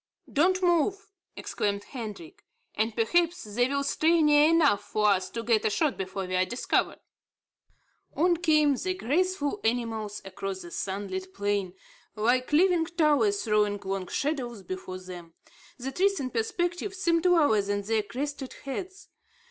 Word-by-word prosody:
"Don't 370 +5 +2
move," 360 +4 +1 0.2
exclaimed 200 -1 -2
Hendrik, 210 - -8 0.3
"and 220 +1 -1
perhaps 345 +9 +1
they 220 +4 0
will 280 +1 -1
stray 325 +3 +2
near 295 0 +5
enough 300 -11 +4
for 210 +1 +1
us 190 -2 +1
to 230 - -5
get 225 -2 +2
a 220 - +2
shot 295 +6 +1
before 190 0 -4
we 185 0 -3
are 185 - +3
discovered." 240 +6 -1 1.2
On 345 +3 +3
came 305 -3 +3
the 370 +7 -2
graceful 365 - 0
animals 225 -3 -1
across 195 0 -5
the 175 - -10
sunlit 190 -1 -4
plain, 200 -2 -1 0.4
like 245 +5 +1
living 335 +1 +3
towers 340 +5 +2
throwing 210 -2 +1
long 190 -1 -3
shadows 245 - -3
before 185 0 -6
them. 180 -3 -10 0.4
The 265 +1 -5
trees 390 +7 +1
in 255 -2 -3
perspective 350 - -2
seemed 335 -3 +1
lower 295 - +4
than 205 0 -2
their 220 +1 +1
crested 270 +4 -5
heads. 375 +7 -6
245 Hz, 150 wpm, -27 LUFS, 205-330 Hz, 1.2 s, near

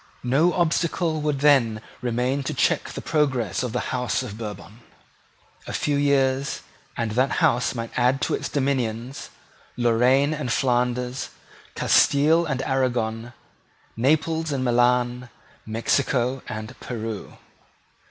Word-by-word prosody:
No 140 +8 +3
obstacle 170 -1 0
would 150 -2 -1
then 130 -7 +4 0.2
remain 125 +3 0
to - - -3
check - - +2
the - - -7
progress 130 - 0
of 125 -2 -3
the - - -3
House 125 +1 -1
of 110 -5 -7
Bourbon. 105 0 -8 0.9
A - - -5
few 145 - 0
years, 140 -1 +1 0.4
and 115 -2 -1
that 130 +5 +1
House 125 +2 +2
might 115 -1 -5
add 125 +2 +2
to - - 0
its - - -2
dominions 130 -2 -2 0.5
Loraine 125 +5 +3
and 145 -5 -3
Flanders, 125 +1 0 0.5
Castile 160 +4 +4
and 135 -3 -2
Aragon, 120 -3 -1 0.6
Naples 160 +5 +1
and 135 -2 -1
Milan, 125 0 +2 0.4
Mexico 125 +3 0
and 110 0 -6
Peru. 110 -3 -6
125 Hz, 125 wpm, -24 LUFS, 120-140 Hz, 0.9 s, then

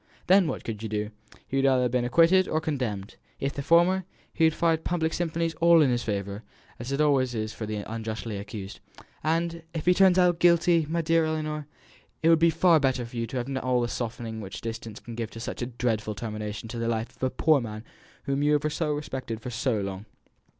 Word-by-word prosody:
Then 190 -1 +5
what - - -4
could 110 -2 -5
you 110 - -4
do? 105 0 -2 0.4
He 135 - -2
would 135 - +2
either 130 -1 +3
have 125 - 0
been 125 -1 +1
acquitted 170 +8 +4
or 155 - 0
condemned; 125 - -3 0.2
if 135 +1 -2
the 140 - -4
former, 175 +5 +4 0.3
he 165 - +3
would 160 - +3
find 165 -1 +1
public 160 -2 -1
sympathy 165 -1 -1
all 170 0 +7
in 135 - +3
his 120 -1 0
favour; 100 -1 -3 0.4
it 135 +4 -3
always 135 -5 +2
is 110 0 -3
for 110 - -6
the 110 - -3
unjustly 110 -1 -4
accused. 100 -1 -7 0.4
And 165 +2 0
if 160 - -3
he 180 - +6
turns 190 -1 +5
out 180 - +6
to 175 - +4
be 165 - -17
guilty, 170 -1 +4
my 165 +1 0
dear 165 0 +3
Ellinor, 155 -2 -3 0.6
it 165 - +5
will 165 - +8
be 165 +1 +4
far 165 0 +4
better 130 -3 0
for 115 - -12
you 115 -1 -2
to 130 - -5
have 130 +2 -3
all 125 -1 +1
the 120 - 0
softening 115 -2 -4
which 95 -2 -7
distance 115 -1 -6
can 120 - -10
give 115 -1 -4
to 115 - -10
such 115 - -5
a 120 - -1
dreadful 115 -4 -2
termination 105 0 -5
to 115 - -5
the 115 - -1
life 115 0 -2
of - - -30
a 130 - +2
poor 145 +2 +3
man 110 -2 -6 0.4
whom 140 0 -1
you 150 +1 +3
have 150 - +2
respected 145 -7 -3
so 110 -1 0
long." 100 +1 -5
130 Hz, 225 wpm, -27 LUFS, 115-160 Hz, 0.6 s, will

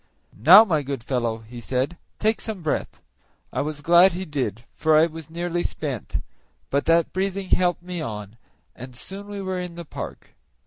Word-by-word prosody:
"Now, 180 - +9
my 160 -7 +1
good 140 -4 -5
fellow," 115 -3 -1
he 120 +1 -9
said, 130 +7 -1 0.2
"take 220 +1 +1
some 210 -6 -5
breath." 155 - -2 0.5
I - - 0
was 150 0 -4
glad 175 +4 +6
he 185 +2 -4
did, 125 - -3
for 155 -1 +3
I 155 - +6
was 160 -1 -8
nearly 175 +1 -2
spent, 140 - -4 0.5
but 140 +1 +1
that 165 0 +3
breathing 190 0 -2
helped 175 -1 +2
me 180 -2 -5
on, 105 -4 -6 0.4
and 125 +1 -10
soon 195 +10 -7
we 200 -1 -5
were 190 -1 -2
in 180 -1 -6
the 170 0 -7
park. - - -8
165 Hz, 180 wpm, -24 LUFS, 130-180 Hz, 0.5 s, Now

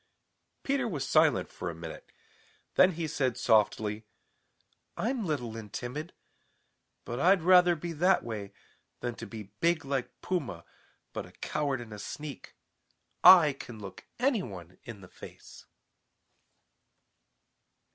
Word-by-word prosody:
Peter 270 -2 0
was 145 - -3
silent - - +4
for 90 - -5
a 85 - -6
minute. 80 -1 -9 0.6
Then 185 0 +5
he 165 0 -3
said 130 -5 -1
softly: 110 -1 +2 0.9
"I'm 230 -3 -1
little 125 -8 -2
and 110 -3 -8
timid, 145 - -5 0.9
but 120 +2 -4
I'd 180 +3 +4
rather 180 -1 +6
be 170 +1 -5
that 180 +5 +3
way 105 -4 -5 0.5
than 120 -1 -2
to - - -8
be 105 -4 -9
big 165 -3 +2
like 135 -2 -3
Puma 170 - -3 0.5
but - - -5
a - - -16
coward 140 -4 -2
and 115 -3 -9
a 105 - -8
sneak. 145 +7 -8 0.7
I 175 -5 +9
can 120 -4 -10
look 95 -2 -10
any 250 -3 +2
one 90 - -9
in 115 -4 -9
the 95 - -12
face." - - -13
135 Hz, 135 wpm, -30 LUFS, 110-175 Hz, 0.9 s, I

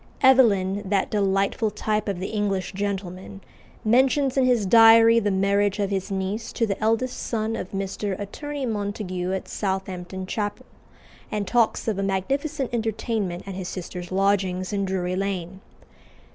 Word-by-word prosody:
Evelyn, 205 -7 +5
that 195 -1 0
delightful 200 +2 +1
type 210 +1 -2
of 195 -3 -2
the 185 - -4
English 205 -3 -1
gentleman, 195 -1 -4 0.5
mentions 265 +4 +3
in 265 -2 +3
his 245 -5 +2
Diary 225 +2 +7
the 205 -2 0
marriage 200 +1 +1
of 200 -1 -1
his 195 0 -2
niece 195 +3 -3
to 230 - +1
the 195 -3 -3
eldest 225 +4 +1
son 225 -1 -2
of 185 - -5
Mr. 195 0 -3
Attorney 285 +7 -5
Montague 205 -4 -3
at 190 -1 -3
Southampton 190 -1 -4
Chapel, 205 +2 -3 0.7
and 210 -1 -1
talks 230 +4 +1
of 210 -3 0
a - - 0
magnificent 265 +9 -1
entertainment 220 -5 -2
at 195 - -5
his 185 -1 -5
sister's 180 -1 -6
"lodgings" 190 -1 +1
in 200 -1 0
Drury 185 -1 -2
Lane. 190 -1 -3
200 Hz, 150 wpm, -24 LUFS, 190-225 Hz, 0.7 s, Diary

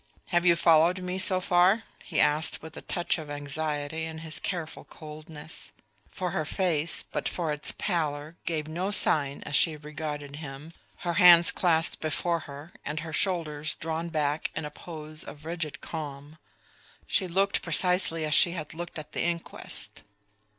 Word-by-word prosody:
Have 175 0 +2
you 170 - +7
followed 165 +2 +5
me 180 +1 -3
so 190 -1 +5
far?" 185 +4 +4 0.2
he 165 - -2
asked 150 +2 +2
with 160 0 -10
a - - -7
touch 175 -1 -1
of 155 -2 -8
anxiety 145 +2 -3
in 160 0 -6
his 155 -1 -3
careful 170 -4 -4
coldness; 155 0 -9 0.4
for 180 -1 -3
her 155 - -1
face, 165 -1 +2
but - - -3
for 165 -3 -2
its 150 0 +3
pallor, 155 -4 -2
gave 155 -2 -1
no 175 +5 -2
sign 145 -8 +4
as 145 - -2
she 160 +1 +4
regarded 150 -1 -6
him, 145 +1 -8 0.3
her 175 - +1
hands 175 -1 +9
clasped 165 -2 +1
before 165 +2 0
her 145 +4 -10
and 150 +2 -3
her 160 -1 -7
shoulders 155 -5 0
drawn 165 +1 -3
back 150 -1 -1
in 160 - -3
a 150 - -6
pose 155 -1 -5
of 150 +1 -11
rigid 160 -2 -4
calm. 150 -1 -7 0.7
She 190 - +1
looked 195 +3 +1
precisely 170 -1 +1
as 150 - 0
she 170 +3 +6
had 155 -4 -6
looked 170 +1 -7
at 150 -1 -8
the - - -2
inquest. 170 -1 -3
160 Hz, 165 wpm, -28 LUFS, 150-175 Hz, 0.7 s, hands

